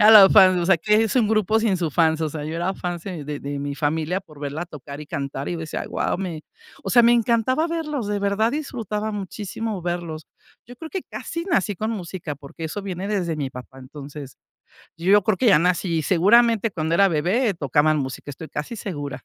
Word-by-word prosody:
Era 210 +1 +8
la 200 -3 +10
fan, 190 -3 +7
o 170 - -1
sea, 190 - +5
que 210 +6 +3
es 225 +3 -1
un 235 - +4
grupo 215 0 +2
sin 220 -4 +1
su 170 -3 -2
fans, 160 0 +2
o 160 - 0
sea, 150 0 -6
yo 155 +2 -4
era 175 +3 -1
fans 175 -3 -4
de 175 -6 -6
de 145 0 -5
de 140 0 -4
mi 140 0 -3
familia 160 +5 -1
por 155 -6 -17
verla 145 +4 -4
tocar 145 -3 -9
y 150 - -8
cantar, 140 -3 -4
y - - -2
yo - - -5
decía: 160 -1 -4
"Guau", - - -1
me 170 -5 -4 0.4
o - - -2
sea, 240 - +6
me 235 +1 +6
encantaba 240 +5 +2
verlos, 300 -8 -3
de 205 -1 -1
verdad 200 +3 +1
disfrutaba 220 -8 -3
muchísimo 205 0 -5
verlos. 175 -2 -4 0.4
Yo 245 - -11
creo 320 +5 -9
que 380 - -3
casi 335 0 -6
nací 205 - +1
con 220 +5 -3
música, 175 -7 -5
porque 145 +4 -10
eso 160 +6 -4
viene 190 0 -4
desde 185 -6 -1
mi 140 -3 -3
papá. 125 +1 -11
Entonces, 140 +1 -10 0.6
yo 195 +5 +4
creo 205 +1 +1
que 250 - 0
ya 195 - +7
nací, 175 0 +1
seguramente, 225 +6 +4
cuando 160 -3 -1
era 195 +3 +5
bebé 190 - +1
tocaban 150 0 +2
música, 135 +1 -5
estoy 155 +3 -9
casi 150 +11 -5
segura. 145 - -6
180 Hz, 220 wpm, -23 LUFS, 155-215 Hz, 0.6 s, la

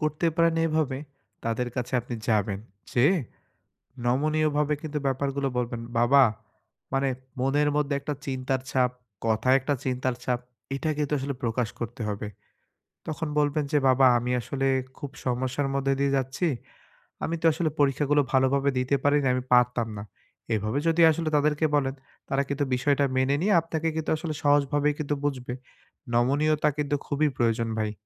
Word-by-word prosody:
করতে 155 +2 0
পারেন 165 -1 +4
এভাবে, 155 -4 0 0.5
তাদের 115 +2 -1
কাছে 125 0 -3
আপনি 120 +1 -6
যাবেন। 105 -3 +1 0.3
যেয়ে 145 +10 +4 0.9
নমনীয় 155 +5 +2
ভাবে 150 0 +2
কিন্তু 155 -2 -4
ব্যাপার 135 +1 0
গুলো 140 -1 0
বলবেন, 120 -1 -2 0.2
বাবা 135 +4 +6 0.7
মানে 135 0 +2 0.3
মনের 145 +3 +2
মধ্যে 150 -1 +1
একটা 145 +2 -3
চিন্তার 130 -1 -2
ছাপ, 125 -2 +2 0.3
কথায় 115 +4 +3
একটা 145 +2 -1
চিন্তার 130 -1 -1
ছাপ, 125 -1 0 0.4
এটা 155 +3 -2
কিন্তু 150 -1 -1
আসলে 140 +1 -3
প্রকাশ 115 -1 0
করতে 120 +2 -5
হবে। 105 +1 -4 0.8
তখন 160 +1 -3
বলবেন 145 +1 +1
যে, 150 - +3
"বাবা 130 +1 +5
আমি 120 +1 -2
আসলে 135 +3 -3 0.3
খুব 145 - -6 0.2
সমস্যার 130 +2 -1
মধ্যে 135 0 +1
দিয়ে 140 0 +2
যাচ্ছি। 135 +6 -1 0.8
আমি 165 - -1
তো - - -2
আসলে 160 +1 0
পরীক্ষা 145 0 +2
গুলো 145 0 +5
ভালো 130 0 +5
ভাবে 140 0 +2
দিতে 130 +2 +1
পারি 145 +1 +4
নাই 130 - +3
আমি 130 - -2
পারতাম 125 -1 +3
না।" 100 - -5 0.5
এভাবে 110 +4 -1
যদি 165 +1 +3
আসলে 160 0 -1
তাদেরকে 150 +1 +2
বলেন। 135 -2 +1 0.3
তারা 135 0 +2
কিন্তু 140 +1 0
বিষয়টা 140 +2 +2
মেনে 130 +2 +2
নিয়ে 205 +3 +3
আপনাকে 165 0 -3
কিন্তু 160 -1 -2
আসলে 155 0 -4
সহজ 145 0 +5
ভাবে 145 0 +2
কিন্তু 145 -1 -1
বুঝবে। 130 -3 -2 0.6
নমনীয়তা 145 +5 +2
কিন্তু 145 -1 0
খুবই 150 +1 +1
প্রয়োজন 115 -1 +1
ভাই। 110 -1 0
135 Hz, 165 wpm, -26 LUFS, 125-150 Hz, 0.9 s, বাবা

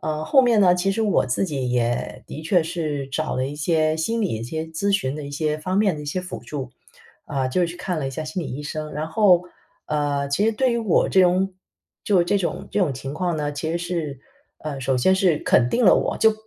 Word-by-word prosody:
呃， 155 0 -3
后 270 - +5
面 235 -3 +3
呢， 180 -3 +6
其 180 +2 0
实 225 +3 0
我 205 - +2
自 130 +9 0
己 135 -8 -2
也 120 -1 -1
的 155 - -8
确 170 +1 +3
是 155 -5 -3
找 135 - -2
了 130 - 0
一 140 - -6
些 155 +1 +1
心 225 +8 -1
理 200 - +1
一 110 - -6
些 160 +7 -4
咨 160 +5 -2
询 135 -9 0
的 150 - -6
一 140 - -7
些 150 +1 -1
方 185 +5 -2
面 205 -4 +3
的 - - -7
一 145 - -9
些 170 +6 -2
辅 180 0 -7
助。 135 -4 -5 0.6
啊， 135 -2 -1
就 130 - 0
是 175 - +3
去 170 +1 -7
看 180 -2 -3
了 140 - -2
一 - - -3
下 145 +4 -5
心 155 +4 -4
理 - - -5
医 145 +3 -5
生， 155 +1 -5
然 150 +1 -3
后， 180 0 +4 0.4
呃， 145 -2 -1
其 140 +9 +1
实 225 - +2
对 255 +4 +1
于 235 - 0
我 220 -6 +2
这 190 - +4
种 185 +1 +3 0.5
就 190 -4 +4
这 175 +4 +1
种 180 - -3
这 - - -1
种 170 -9 +1
情 135 +2 -6
况 175 0 -1
呢， 150 -1 -2
其 145 +2 -4
实 - - 0
是 165 -6 -4 0.4
呃， 145 -3 -5
首 130 0 0
先 125 +10 +3
是 185 -5 +3
肯 120 -1 +3
定 245 - +1
了 185 - +8
我， - - -1
就 220 - +5
160 Hz, 275 characters per minute, -23 LUFS, 145-185 Hz, 0.6 s, 了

